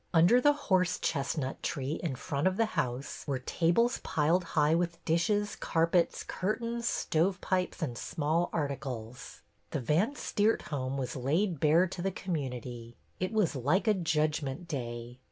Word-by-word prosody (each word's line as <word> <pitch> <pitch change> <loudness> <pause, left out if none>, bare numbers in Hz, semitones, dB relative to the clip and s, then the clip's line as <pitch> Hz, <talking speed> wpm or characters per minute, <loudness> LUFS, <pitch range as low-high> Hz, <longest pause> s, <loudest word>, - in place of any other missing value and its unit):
Under 175 +10 +6
the 290 +3 +5
horse 190 - +1
chestnut 140 -2 -2
tree 140 0 -2
in 160 -7 -2
front 140 +4 -1
of 185 +1 0
the 225 - +4
house 125 +3 -2
were 140 -2 0
tables 175 - +1
piled 165 +4 +2
high 150 +1 +5
with 170 0 0
dishes, 205 +6 +1
carpets, 170 +1 +1
curtains, 235 +4 -2
stovepipes, 185 +2 0
and 125 -6 -2
small 160 +6 0
articles. 130 -6 -4 0.3
The - - -2
Van 165 - +1
Steert 215 -5 +1
home 135 -2 -3
was 130 -2 -3
laid 160 +7 0
bare 160 +5 +5
to 185 -1 -6
the 195 - +1
community. 125 - -5 0.2
It 185 +2 -1
was 210 -9 +1
like 145 - +1
a 215 - +6
judgment 155 -4 -1
day. 120 -4 -5
160 Hz, 150 wpm, -30 LUFS, 135-185 Hz, 0.3 s, Under